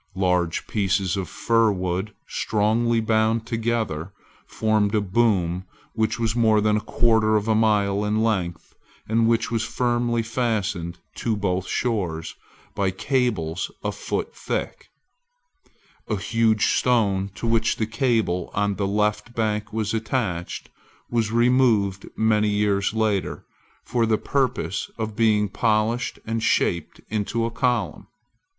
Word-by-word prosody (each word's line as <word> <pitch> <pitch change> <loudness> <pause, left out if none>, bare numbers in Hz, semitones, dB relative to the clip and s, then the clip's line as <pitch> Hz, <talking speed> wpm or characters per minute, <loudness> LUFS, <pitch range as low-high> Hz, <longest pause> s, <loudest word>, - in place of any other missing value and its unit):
Large 90 -3 +1
pieces 100 -2 0
of 95 -2 -3
fir 115 -2 +2
wood, 95 +2 -3
strongly 115 +2 +1
bound 110 0 +1
together, 110 -8 -2 0.4
formed 110 -1 +1
a - - +4
boom 95 -4 +1 0.3
which 110 +1 0
was 115 -1 0
more 110 -3 +4
than 105 0 +2
a - - -2
quarter 110 -2 +2
of 105 0 0
a 110 - +3
mile 105 -2 +2
in 105 +1 +1
length, 90 -7 -2 0.3
and 115 +1 +2
which 115 0 +1
was 115 -1 0
firmly 120 -1 0
fastened 105 -7 -2 0.2
to 115 -2 0
both 95 -2 -1
shores, 90 -10 -2 0.4
by 100 -1 0
cables 95 - -1
a - - -1
foot - - -4
thick, - - -4 1.2
A 105 - 0
huge 110 +1 +2
stone, 100 -6 +2
to - - -5
which 115 0 +2
the 110 - -1
cable 110 -7 0
on 100 -1 0
the 100 - 0
left 105 +4 0
bank 105 -1 -1
was 110 -1 -2
attached, 110 -6 -2 0.4
was 115 -2 +1
removed 115 -5 +2
many 105 -1 +3
years 105 -1 +1
later, 110 -3 -1 0.4
for 115 -2 +1
the 110 -1 +3
purpose 130 -7 -1
of 110 -2 -4
being 105 -2 +3
polished 110 +3 0
and 115 0 -2
shaped 85 -6 0
into 110 +2 -1
a 115 - -2
column. 125 +1 -1
110 Hz, 135 wpm, -24 LUFS, 100-115 Hz, 1.2 s, a